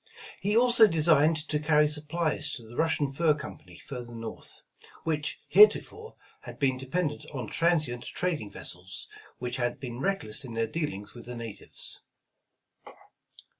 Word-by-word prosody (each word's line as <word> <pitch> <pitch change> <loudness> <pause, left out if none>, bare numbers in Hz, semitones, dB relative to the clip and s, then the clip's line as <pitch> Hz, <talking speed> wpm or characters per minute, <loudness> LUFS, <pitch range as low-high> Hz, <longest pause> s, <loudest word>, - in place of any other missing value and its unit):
He 205 +3 +2
also 240 -2 +7
designed 160 -2 +4
to 150 - 0
carry 150 0 +4
supplies 150 0 -1
to 120 - -5
the 120 - -12
Russian 155 -3 +1
Fur 155 +2 +3
Company 150 - -10
further 120 -3 -8
North, 115 0 -8 0.4
which 150 -2 -1
heretofore, 435 +1 +5 0.3
had - - -10
been 135 -2 +2
dependent 145 +4 -2
on 130 - -3
transient 155 -8 +1
trading 165 - -2
vessels, 90 -1 -5 0.3
which 125 0 -4
had 120 -1 -1
been 120 -2 -6
reckless 145 - +1
in 120 -4 -7
their 115 0 +1
dealings 110 -6 -4
with 120 -1 -11
the 125 - -6
natives. 115 -4 -5
150 Hz, 140 wpm, -28 LUFS, 120-165 Hz, 0.4 s, also